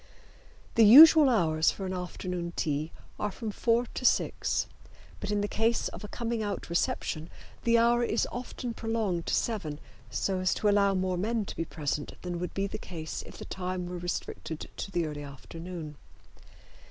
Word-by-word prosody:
The 230 - +5
usual 300 +6 +10
hours 160 -9 +3
for 195 - -4
an 185 - -3
afternoon 180 -1 -4
tea 150 0 -1 0.3
are 210 - 0
from 220 +2 -5
four 235 +3 +2
to 250 - -7
six, - - +2 0.5
but 205 - -5
in 205 0 +1
the 205 - 0
case 225 +3 +1
of - - -9
a - - -5
coming 235 0 -3
out 200 -4 -4
reception 165 -1 -1 0.4
the 235 0 +5
hour 235 +1 +4
is 230 -1 +1
often 245 0 -5
prolonged 225 -7 -2
to - - +2
seven 175 -11 -2 0.3
so 185 - -1
as 185 0 +1
to 215 - 0
allow 200 -1 +4
more 185 -1 0
men 220 +3 0
to - - -7
be 165 - -2
present 150 -2 -4
than 175 -1 -3
would 180 - -4
be 195 - 0
the 200 - -5
case 160 -3 -6
if - - -11
the - - -8
time 185 -1 -4
were 175 0 -5
restricted 170 -2 -5
to - - -5
the 175 -3 0
early 150 -1 -5
afternoon. 155 +2 -8
185 Hz, 180 wpm, -29 LUFS, 170-225 Hz, 0.5 s, usual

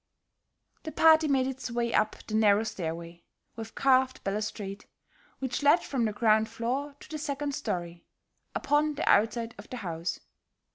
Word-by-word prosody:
The 315 - -6
party 320 -1 +5
made 270 -3 +2
its 265 -1 -4
way 235 -1 -1
up 215 0 +2
the 215 - -8
narrow 215 -1 +4
stairway 170 -5 -5 0.3
with 225 0 -8
carved 260 -1 +2
balustrade, 205 0 -4 0.5
which 260 0 -3
led 290 +5 +5
from 255 -4 -1
the 215 - 0
ground 220 0 +3
floor 260 +6 -3
to - - -12
the 310 - -6
second 290 -1 -3
story, 175 -11 -4 0.5
upon 295 +1 +1
the - - -3
outside 230 +2 +3
of 205 - -11
the 250 - -5
house. 170 -5 -4
230 Hz, 155 wpm, -29 LUFS, 205-275 Hz, 0.5 s, party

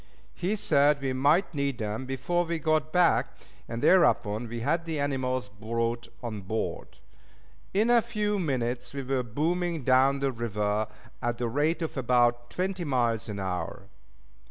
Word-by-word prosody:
He 190 +5 -1
said 145 -6 +3
we 135 -1 -1
might 145 +9 +3
need 140 -3 -1
them 110 +3 -4
before 175 +7 0
we 170 0 -2
got 155 0 +1
back, 180 0 +3 0.3
and 115 0 -4
thereupon 115 - +4
we 115 +1 -5
had 165 +7 0
the 160 -3 -3
animals 130 -4 -1
brought 115 +3 -2 0.2
on 110 -4 -4
board. 110 +4 -4 0.7
In 215 +5 +2
a 240 -1 +6
few 210 -3 -1
minutes 125 -5 -2
we 140 - -3
were 130 0 0
booming 160 +6 -1
down 130 +2 +4
the 135 0 0
river 105 -2 -1 0.3
at 120 -1 -1
the 120 - -1
rate 150 +8 0
of 160 - -4
about 120 -1 +2
twenty 185 0 -2
miles 120 -7 0
an 100 -1 -4
hour. 90 -1 -4
130 Hz, 155 wpm, -28 LUFS, 115-160 Hz, 0.7 s, a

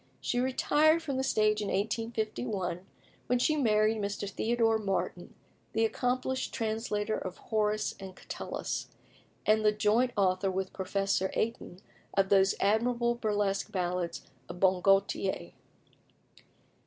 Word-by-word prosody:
She 245 - -1
retired 300 +5 +3
from 280 -4 -2
the 265 - 0
stage 215 -4 +2
in 205 - -2
1851, 215 -3 -2 0.4
when 250 - +2
she 305 +5 +2
married 220 -5 +3
Mr. 200 0 -3
Theodore 225 +2 +1
Martin, 185 -3 -3 0.4
the 225 +1 +3
accomplished 255 +3 -1
translator 220 -1 -1
of 185 - -6
Horace 215 -1 0
and 190 -1 -9
Catullus, - - -5 0.6
and 215 0 +3
the 210 - +5
joint 215 +4 +2
author 190 0 +2
with 190 0 -3
Professor 195 0 0
Aytoun 215 -5 -3 0.3
of 195 -1 +2
those 195 -1 +4
admirable 235 +3 +2
burlesque 205 -4 -1
ballads 180 -2 -2 0.2
of 180 - -7
"Bon 185 -1 +3
Gaultier." 195 - +1
210 Hz, 125 wpm, -30 LUFS, 195-230 Hz, 0.6 s, the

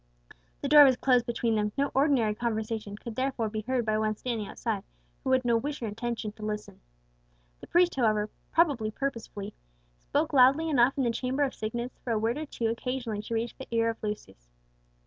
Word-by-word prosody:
The - - 0
door 295 +1 +9
was 260 -3 +5
closed 250 -2 +3
between 235 -1 0
them; 210 -1 0
no 280 0 +1
ordinary 265 -6 +3
conversation 220 -2 -3
could 230 0 -8
therefore 255 -3 -1
be 215 0 -3
heard 245 +1 -1
by 215 -1 +1
one 215 0 0
standing 225 -2 -3
outside, 215 -5 -3 0.4
who 260 - 0
had 260 -1 +3
no 235 -1 +3
wish 290 +5 -3
or 235 - -4
intention 225 0 -3
to 215 0 -12
listen. 210 0 -5 0.8
The - - -11
priest, 350 0 +4
however, 215 -4 +1 0.2
probably 285 -10 +2
purposely, 215 -5 -5 0.5
spoke - - -1
loudly 275 +5 +5
enough 255 -1 +4
in 270 - +2
the 235 - +2
chamber 255 +4 -1
of 275 - -1
sickness 235 +3 -5
for 240 - -3
a - - +1
word 225 +5 0
or 310 - -5
two 235 - -4
occasionally 230 -1 -2
to 230 +2 -4
reach 230 +1 -2
the 265 - -7
ear 230 0 +2
of 225 - -12
Lucius. 95 - -6
235 Hz, 200 wpm, -28 LUFS, 215-260 Hz, 0.8 s, door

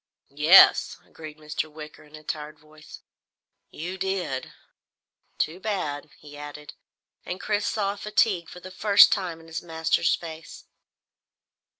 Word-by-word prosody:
"Yes," 155 +6 +6
agreed 155 -1 -11
Mr. 155 0 -5
Wicker 150 0 -11
in 150 +1 -15
a 155 - -13
tired 150 0 -6
voice, 155 0 -15 0.7
"You 180 +4 -7
did. 185 -8 -3 0.9
Too 165 +4 -2
bad," 155 -8 -4
he 145 -1 -14
added, 145 0 -10 0.5
and 180 - -6
Chris 205 -1 -1
saw 200 -2 -1
fatigue 205 -4 0
for 180 - -11
the 185 - -10
first 200 +2 +6
time 180 -5 -2
in 165 - -16
his 165 +1 -6
master's 165 -1 0
face. 160 -1 -10
160 Hz, 130 wpm, -25 LUFS, 150-190 Hz, 0.9 s, Yes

